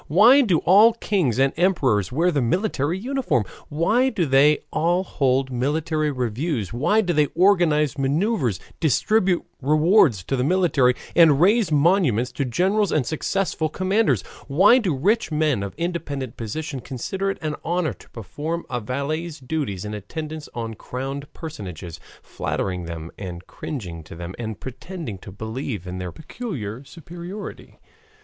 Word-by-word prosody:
Why 230 - +7
do 195 -10 +3
all 210 +6 +7
kings 185 - 0
and 135 +1 +3
emperors 135 - +2
wear 170 +7 +2
the 145 -4 +1
military 170 - 0
uniform? 240 - 0 0.3
Why 215 - +2
do 200 -9 0
they 140 +2 +4
all 175 +3 +2
hold 135 -5 0
military 150 +4 0
reviews, 125 - -2
why 150 - +2
do 180 -4 0
they 150 -2 +3
organize 165 -6 +3
maneuvers, 140 - 0 0.2
distribute 180 - +2 0.2
rewards 150 - +4
to 135 - -1
the 125 - 0
military, 150 -6 +3 0.2
and 160 -5 +6
raise 200 +1 +4
monuments 145 - +3
to 135 +2 -2
generals 190 - +1
and 145 -5 +1
successful 160 +2 -1
commanders? 185 - +1 0.2
Why 190 - +6
do 185 - 0
rich 200 - +1
men 150 -7 +1
of 100 -1 -5
independent 145 -8 -3
position 135 +5 -5
consider 190 +11 -3
it 195 - -3
an 155 -1 -2
honor 175 -1 0
to - - -18
perform 150 - -5
a 125 - -1
valet's 150 +7 -3
duties 125 - -3
in 105 - -5
attendance 155 - -6
on 115 -1 -4
crowned 135 +5 -6
personages, 90 - -8 0.2
flattering 90 -2 -3
them 85 -1 -7
and 90 -2 -7
cringing 90 - -6
to 85 - -10
them 85 +2 -7
and 110 -3 -5
pretending 130 - -7
to 95 - -11
believe 110 -1 -5
in 90 0 -5
their 90 -1 -4
peculiar 140 - -6
superiority? 175 +6 -9
150 Hz, 150 wpm, -23 LUFS, 120-175 Hz, 0.3 s, Why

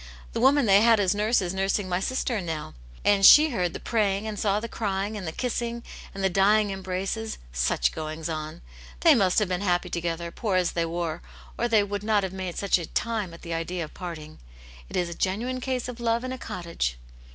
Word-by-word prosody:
The - - -2
woman 270 +1 +5
they 200 -1 +6
had 225 -1 +5
as 195 -1 +2
nurse 210 +1 +2
is 180 0 -3
nursing 195 +1 0
my 180 0 0
sister 240 0 -1
now, 160 -3 -5 0.3
and 200 -1 +4
she 305 +9 +9
heard 180 -7 -1
the - - -5
praying, 210 -2 0
and 210 -2 -4
saw 205 -1 +1
the 230 - -5
crying 205 -1 -2
and 195 -5 -5
the - - -2
kissing, 235 +2 -3 0.3
and 195 - -4
the - - +5
dying 205 +3 +3
embraces; 195 +3 -3 0.2
such - - +1
goings 155 0 -5
on! 155 0 -5 0.4
They 330 -2 +7
must 195 -8 +2
have 210 - +3
been 180 +1 -2
happy 180 -3 0
together, 170 0 -3
poor 210 -2 -2
as 180 -2 +2
they 170 -1 0
were, 170 -1 -3 0.3
or 240 - 0
they 220 -3 +4
would 200 0 -4
not 210 -1 +2
have 190 -1 -3
made 185 -2 -5
such 200 -2 +2
a 170 - -6
time 220 -6 -2
at 170 - -13
the 170 - -4
idea 165 +1 -3
of 155 - -9
parting. 165 -4 -8 0.5
It - - -7
is 175 - +1
a 170 - -5
genuine 230 +9 -2
case 255 -1 -2
of 250 -1 -7
love 230 0 0
in 255 - -4
a 260 - -7
cottage." 170 - -3
195 Hz, 220 wpm, -26 LUFS, 175-220 Hz, 0.5 s, she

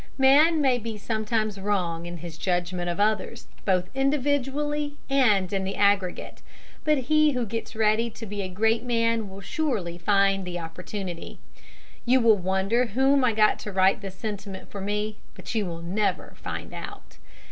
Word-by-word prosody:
Man 295 +4 +5
may 260 -3 +3
be 225 0 -5
wrong - - -8 0.3
sometimes 215 -2 0
in 175 -4 -2
his 170 -1 -8
judgment 175 0 -1
of 175 - -3
others, 215 +1 0 0.2
both 185 -2 +2
individually 285 +2 0 0.2
and 210 -9 +3
in 195 -1 0
the 195 +1 -3
aggregate, 200 -3 +1 0.4
but 305 -1 +3
he 305 +3 +3
who 250 -2 -1
gets 225 +1 -5
ready 220 +1 +2
to 225 0 -9
be 205 -1 -4
a 190 - -4
great 220 +5 +1
man 230 -3 +1
will 195 +1 -10
surely 200 - -2
find 195 +1 +3
the 180 -1 -4
opportunity. 175 +1 -6 0.7
You 255 +2 +4
will 230 -3 +5
wonder 190 +6 +1
whom 265 +5 +3
I 240 -3 +3
got 215 0 +3
to 210 - -6
write 190 +1 +3
this 195 -2 -7
sentiment 200 -2 -6
for 200 - -6
me, 210 +2 -2 0.2
but - - -7
you 215 -4 0
will 170 -1 -6
never 200 +5 -1
find - - -6
out. - - -9
210 Hz, 170 wpm, -26 LUFS, 190-245 Hz, 0.7 s, Man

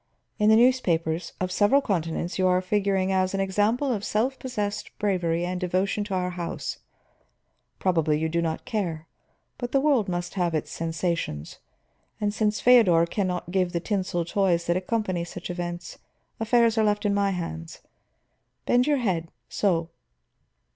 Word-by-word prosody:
In 210 0 +4
the 220 - +7
newspapers 175 -9 +2
of 185 0 -2
several 205 +8 +4
continents 175 - -2
you 185 - +3
are 180 0 +3
figuring 195 0 0
as 185 0 +1
an - - -1
example 210 +8 +1
of 205 -3 -3
self 250 +7 0
possessed 210 -5 -3
bravery 175 -4 0
and 180 0 -3
devotion 185 +3 0
to 200 -2 -3
our 180 0 -1
house; 175 -1 -5 1.0
probably 165 -5 +1
you 160 +1 0
do 170 +1 0
not 160 -1 -3
care, 180 -10 -3 0.5
but 245 0 -4
the 275 - +5
world 270 -8 +2
must 175 0 -3
have 175 -4 0
its 155 - -2
sensations. 165 - -3 0.6
And 205 -1 0
since 210 0 0
Feodor 205 -10 +6
can 190 +3 -1
not 180 -1 -4
give 185 -1 +1
the 170 - 0
tinsel 185 -3 -1
toys 175 -2 +1
that 170 - +1
accompany 185 -2 -1
such 175 +1 -7
events, 175 -1 -5 0.4
affairs 230 0 +3
are - - +4
left 210 0 +1
in 205 - +2
my 200 0 +2
hands. 80 - -5 0.8
Bend 245 +2 +3
your 295 -1 +3
head 180 -9 -1 0.2
so." 170 -5 0
185 Hz, 160 wpm, -26 LUFS, 170-210 Hz, 1.0 s, the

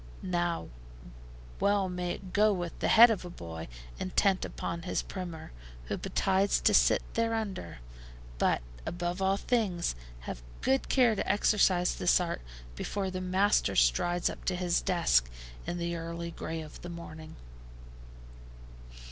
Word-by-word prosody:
Now 175 -2 -1 0.9
well 200 -1 +2
may 180 -1 -2
it 185 -2 -10
go 210 +1 +5
with 175 -4 -4
the - - 0
head 230 +1 +8
of 210 - -2
a 180 - -7
boy 80 - -8 0.3
intent 190 +1 +1
upon 170 0 -4
his 180 - -2
primer, 175 -4 -7 0.3
who - - -2
betides 195 +1 +1
to - - +4
sit - - +5
thereunder! 225 - -2 0.6
But, - - +2 0.2
above 175 +1 -3
all 190 +1 +2
things, 200 -8 0 0.3
have - - -6 0.2
good 265 +1 +1
care 245 -4 +4
to 200 - 0
exercise 190 -3 +3
this 180 - +3
art 175 -1 -2 0.3
before 195 - -3
the 185 0 -4
master 190 +3 +2
strides 170 - +3
up - - -5
to 185 - +1
his 175 -1 +1
desk, 60 - +2 0.4
in 175 0 -2
the 170 0 -2
early 170 0 -5
gray 165 -1 -5
of 155 -1 -11
the 175 - -7
morning. 160 -2 -9
180 Hz, 145 wpm, -30 LUFS, 170-195 Hz, 0.9 s, head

